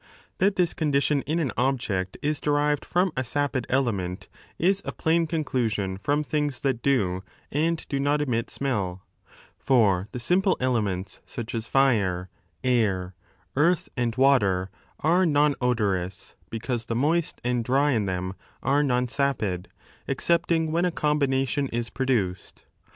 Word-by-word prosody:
That 195 +1 +3
this 180 -2 +2
condition 145 -2 +1
in 155 +3 0
an 155 -6 0
object 115 -8 -1
is 150 0 0
derived 145 0 +1
from 180 +1 +1
a 130 - 0
sapid 135 -1 -1
element 100 -9 -1 0.3
is 190 +3 +2
a - - -4
plain 165 +1 +1
conclusion 115 - -1
from 145 +7 0
things 150 -2 -1
that 130 -4 0
do 95 -10 +1 0.3
and 160 +3 0
do 140 - -2
not 145 +2 +2
emit 125 -5 0
smelL 100 -10 -2 0.6
For 105 -8 +3
the 125 - -5
simple 185 - +2
elements, 100 -7 -1
such 120 -1 -6
as 115 -1 -3
fire, 100 -10 +2 0.3
air, 100 -7 +1 0.4
eartii, 165 +4 +2
and 120 -2 -1
water, 105 -9 +3 0.3
are 175 +5 +3
non 150 -3 +3
odorous 100 -7 -1 0.2
because 115 +1 -3
the 115 - -2
moist 155 +6 +1
and 125 -1 0
dry 140 +5 +2
in 110 -6 +1
them 95 0 -2 0.3
are 140 +2 +3
non 125 -3 +1
sapid, 115 -9 -1 0.4
excepting 165 +3 +1
when 170 +2 +1
a 180 - +3
combination 140 -4 +1
is 120 -1 -3
4 - - -24
produced. 110 -9 -1
130 Hz, 145 wpm, -26 LUFS, 110-150 Hz, 0.6 s, That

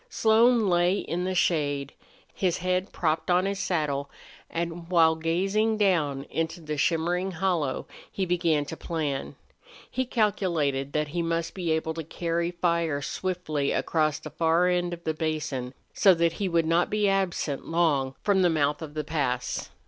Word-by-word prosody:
Slone 230 - +4
lay 175 +1 +3
in 180 -2 -3
the 185 0 -1
shade, 145 -6 0 0.4
his 180 -3 0
head 185 +2 -1
propped 160 +1 -1
on 180 +1 +3
his 195 0 -2
saddle, 145 -7 -1 0.4
and 170 0 -4
while 165 -3 +5
gazing 195 +7 +1
down 160 -10 +1
into 160 +3 -3
the 155 -2 -4
shimmering 175 +5 0
hollow 165 -6 -1 0.3
he 190 - -1
began 170 -4 +1
to 160 - -6
plan. 155 -5 -3 0.6
He 260 - -1
calculated 170 - 0
that 150 -1 0
he 175 +3 -2
must 165 0 -1
be 180 -3 -3
able 160 0 0
to 165 0 -5
carry 170 +2 -2
fire 170 -4 0
swiftly 170 -7 -2
across 155 -2 +1
the 155 - -9
far 165 +3 +2
end 175 -1 +1
of 170 0 -7
the 160 - -1
basin, 155 -5 -3 0.2
so 190 -3 +5
that 170 0 +2
he 195 - +1
would 170 -1 +2
not 165 +2 +2
be 210 -1 +1
absent 190 -7 -1
long 145 -6 +1
from 200 -2 +3
the 180 - +4
mouth 150 -2 +1
of 155 -2 -8
the 155 - -2
pass. 135 -5 -2
165 Hz, 165 wpm, -27 LUFS, 155-180 Hz, 0.6 s, while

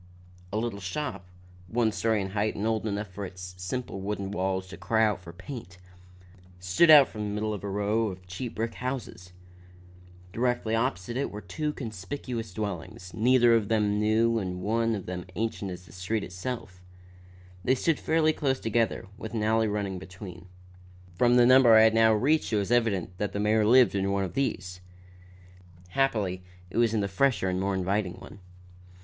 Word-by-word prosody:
A 105 - -2
little 110 -2 -2
shop, 100 0 -4 0.4
one 115 +1 +1
story 110 -1 0
in 95 - -5
height 105 +1 0
and 105 - -3
old 110 -1 0
enough 105 0 -3
for 100 +2 -7
its 90 -1 -8
simple 95 +2 -4
wooden 100 -1 -3
walls 95 -1 -1
to 100 - -9
cry 110 -1 +1
aloud 105 -4 +2
for 90 -2 -11
paint, 95 +1 -9 0.8
stood 90 - +3
out 145 -4 +9
from 105 - -8
the 105 - -2
middle 110 0 -1
of 105 - -6
a 100 - -3
row 105 +3 0
of 95 -2 -7
cheap 90 +7 -6
brick 115 +1 -2
houses. 125 -8 -5 1.0
Directly 120 -2 0
opposite 115 -1 -1
it 140 - -1
were 105 - -7
two 150 +7 -3
conspicuous 115 -1 -6
dwellings, 90 -3 -6
neither 120 +1 +4
of 110 -3 +2
them 105 -1 +1
new 115 +2 +2
and 90 -2 -4
one 115 +2 +1
of 100 - -6
them 90 0 -5
ancient 110 -3 -2
as 90 0 -8
the 85 - -16
street 95 +4 -2
itself. 90 0 -6 0.8
They 130 - +3
stood 155 +4 +1
fairly 160 -1 +2
close 135 -3 0
together, 115 -2 0
with 110 +1 -6
an 110 - -1
alley 110 +1 +2
running 100 -3 -2
between. 90 -1 -10 0.7
From 120 +7 +3
the 120 -1 +6
number 130 -2 +7
I 110 - +8
had 110 0 +5
now 115 0 +5
reached 135 +9 +2
it 110 - +2
was 100 +2 -1
evident 100 -7 +1
that 105 - -2
the 100 - -2
mayor 105 +1 +3
lived 125 +1 +6
in 100 0 0
one 100 0 0
of 95 - -4
these. 95 -9 -2 1.1
Happily 100 -6 0 0.3
it - - -5
was 115 -1 +3
in 105 - +1
the 100 - 0
fresher 100 -2 +1
and 90 0 -1
more 100 0 0
inviting 95 0 -1
one. 95 +2 -12
105 Hz, 185 wpm, -28 LUFS, 95-115 Hz, 1.1 s, out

